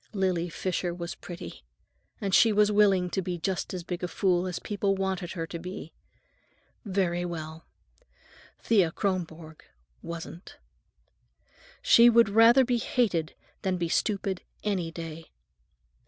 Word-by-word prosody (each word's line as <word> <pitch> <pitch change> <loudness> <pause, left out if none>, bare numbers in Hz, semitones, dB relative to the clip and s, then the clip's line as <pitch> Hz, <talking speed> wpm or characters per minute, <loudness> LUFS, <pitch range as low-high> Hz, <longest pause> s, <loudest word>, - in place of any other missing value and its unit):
Lily 185 -3 0
Fisher 175 0 -2
was 170 -1 -5
pretty, 175 +1 -9 0.6
and 200 -4 -3
she 225 - +6
was 210 0 +3
willing 200 -3 +4
to 190 - -1
be 180 -1 -3
just 180 +2 -2
as 180 -2 -5
big 175 0 -5
a - - 0
fool 180 -1 +1
as 180 - -3
people 200 -2 -1
wanted 190 -2 -2
her 165 -3 -3
to 170 +1 -7
be. 180 -1 -8 0.9
Very 185 -4 0
well; 160 -2 -6 0.9
Thea 200 -7 +3
Kronborg 165 -5 -4 0.4
wasn't. 170 +1 -8 1.3
She 235 +1 +7
would 230 -2 +5
rather 230 +5 +6
be 245 -1 +1
hated 185 -12 0 0.3
than 185 -1 -1
be 170 -1 -2
stupid, 195 -1 -1 0.2
any 190 -5 -1
day. 165 -1 -8
185 Hz, 135 wpm, -28 LUFS, 170-200 Hz, 1.3 s, She